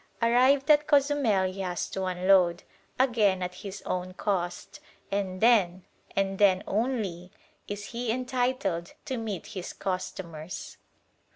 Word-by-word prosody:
Arrived 260 +5 +4
at 300 0 +4
Cozumel 280 -9 +3
he 195 - -9
has 180 -2 -2
to 190 -1 -3
unload, 185 -1 +3 0.4
again 215 -8 +3
at 180 0 -4
his 200 -1 -7
own 185 0 -3
cost, 185 +7 -3 0.3
and 190 -2 -2
then, 190 -6 +4 0.3
and 195 0 0
then 195 -2 +4
only, 205 -6 -2 0.4
is 205 0 -5
he 235 -1 -1
entitled 245 -8 -1
to 260 - -3
meet 215 -6 -4
his 185 -3 -5
customers. 185 -3 -5
195 Hz, 125 wpm, -28 LUFS, 185-240 Hz, 0.4 s, Arrived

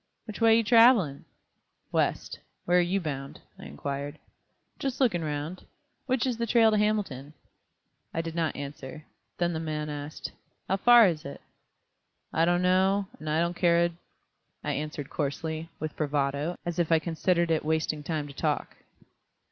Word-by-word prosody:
"Which 215 0 -8
way 225 0 +6
you 230 - +2
traveling?" 225 - +5 0.7
"West. - - -1 0.3
Where 180 +1 +4
're - - +5
you 180 +3 0
bound?" 140 -5 -5 0.2
I - - -10
inquired. 140 - -5 0.6
"Just 270 -2 -3
lookin' 200 -11 +2
round. 150 +4 -4 0.4
Which 260 -1 +1
is 250 -3 -1
the 235 - -1
trail 225 -1 +5
to 215 - +2
Hamilton?" 190 -10 -1 0.8
I 165 - -1
did 165 0 -5
not 165 -1 -1
answer. 140 +2 -8 0.3
Then 175 -1 0
the 160 - -2
man 155 -1 -3
asked: 145 +1 -6 0.4
"How 195 - +1
far 240 +2 +7
is 160 -4 -2
it?" 140 - -8 0.9
"I 165 - +3
don't 175 +1 +2
know, 190 +2 +2
and 155 - -6
I 155 +1 +1
don't 170 +1 -1
care 170 -1 +3
a 170 - +2
d 170 - -16 0.4
," - - -48
I - - -1
answered 150 -1 -4
coarsely, 160 +2 -3
with 155 -1 -4
bravado, 145 +2 -1
as 175 0 -3
if 170 -1 +1
I 165 - +6
considered 170 +1 0
it 160 - +1
wasting 155 -1 -1
time 155 -1 -3
to 140 - -10
talk. - - -2
165 Hz, 170 wpm, -28 LUFS, 150-190 Hz, 0.9 s, far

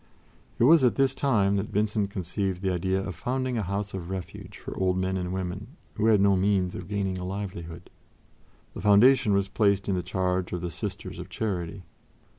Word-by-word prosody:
It - - +2
was 155 +3 +7
at 125 - +4
this 135 -1 +2
time 105 -9 +2
that 100 +2 -2
Vincent 105 -1 0
conceived 95 0 -3
the 95 - +1
idea 95 +2 0
of 100 - -4
founding 130 +7 -2
a 115 - 0
house 100 +1 -3
of 90 -2 -5
refuge 95 -2 -7
for - - -8
old 95 -1 +1
men 95 0 0
and 90 -1 -3
women 95 - -5 0.2
who 110 +1 0
had 110 -2 +5
no 100 0 +4
means 95 -1 +1
of 90 - -7
gaining 95 -2 -2
a - - -5
livelihood. 90 -3 -6 0.8
The - - -7
foundation 115 +3 +5
was 100 0 +1
placed 100 -1 +1
in 100 - +1
the 90 - 0
charge 90 0 -1
of 90 - -3
the 85 0 -4
Sisters 95 +3 -6
of - - -8
Charity. 95 -3 -3
95 Hz, 200 wpm, -27 LUFS, 90-105 Hz, 0.8 s, was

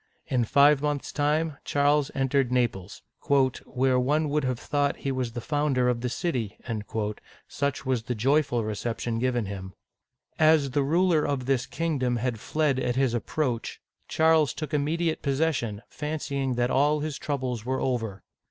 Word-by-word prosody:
In 130 -6 +1
five 140 +3 +5
months' 145 -1 -2
time, 150 +1 0
Charles 145 0 +2
entered 135 -1 +1
Naples, 110 -7 -1 0.6
where 130 0 +1
one 150 +4 +1
would 150 0 0
have 130 -2 -1
thought 145 0 0
he 135 - +1
was 130 -3 -2
the 120 - -4
founder 145 -2 +1
of 120 -1 0
the 125 - -1
city," 125 - -2 0.9
such 140 -1 -2
was 130 -3 +1
the 125 +2 -3
joyful 130 0 +2
recep 110 +2 -3
tion 115 -1 -2
given 120 -2 0
him! 95 -1 -7 0.7
As 155 -3 +4
the 145 +2 +1
ruler 165 +2 +3
of 135 -3 -1
this 130 -2 0
kingdom 140 -7 -1
had 120 -1 -2
fled 150 +1 0
at 125 -2 -1
his 130 -2 +2
approach, 120 0 -2 0.3
Charles 160 -2 +3
took 155 0 -5
immediate 160 +3 0
possession, 135 -7 -1
fancying 140 -4 -3
that 120 +1 +1
all 145 +2 +3
his 150 -3 -4
troubles 130 -6 -3
were 130 +2 -1
over. 115 -7 -2
135 Hz, 160 wpm, -27 LUFS, 125-150 Hz, 0.9 s, five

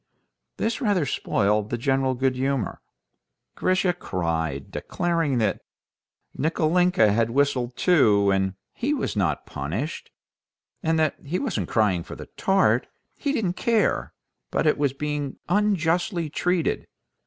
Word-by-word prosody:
This 225 0 -1
rather 200 - +2
spoiled 105 -4 0
the 120 - -1
general 135 +1 +1
good 130 +1 +1
humor. 135 -2 -1 0.7
Grisha 185 -1 +1
cried, 80 - -3
declaring 165 -6 -1
that 110 -4 0 0.7
Nikolinka 160 - +3
had 115 +1 +2
whistled 130 -1 +1
too, 105 - +4
and 95 -1 0 0.2
he 285 +5 -1
was 240 - -2
not 85 -8 0
punished, 85 - -4 0.7
and 160 0 +1
that 155 -1 +1
he 155 +6 -2
wasn't 275 - -2
crying 105 -6 +2
for - - -9
the - - -9
tart—he 195 +8 0
didn't 210 -11 0
care—but 230 -7 -1
at 150 - +3 0.2
being 150 -2 -3
unjustly 175 -4 +1
treated. 180 0 0
145 Hz, 120 wpm, -25 LUFS, 110-180 Hz, 0.7 s, too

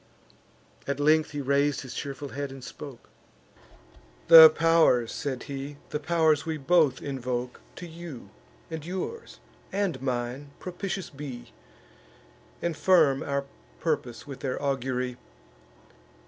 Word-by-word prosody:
At 140 0 -2
length 155 +2 +3
he 145 -1 -4
rais'd 140 +1 +1
his 130 -2 -8
cheerful 140 +1 -5
head, 140 +1 -4
and 135 -1 -10
spoke: 140 -2 -10 1.2
"The 160 -1 +12
pow'rs," 155 -7 +3
said 130 -3 -4
he, 140 0 -6
"the 150 - -2
pow'rs 160 -1 +2
we 160 -1 -3
both 150 -2 +2
invoke, 125 -2 -4
To 175 - -8
you, 160 - -10 0.4
and 160 -2 -5
yours, 190 - -6 0.3
and 195 -6 -1
mine, 130 +2 -3
propitious 185 0 -5
be, 135 -4 -8 1.1
And 170 -2 -1
firm 155 -8 +4
our 140 0 -2 0.3
purpose 145 -7 -2
with 140 -3 -8
their 130 -2 -3
augury! 130 -2 -2
145 Hz, 120 wpm, -27 LUFS, 135-160 Hz, 1.2 s, The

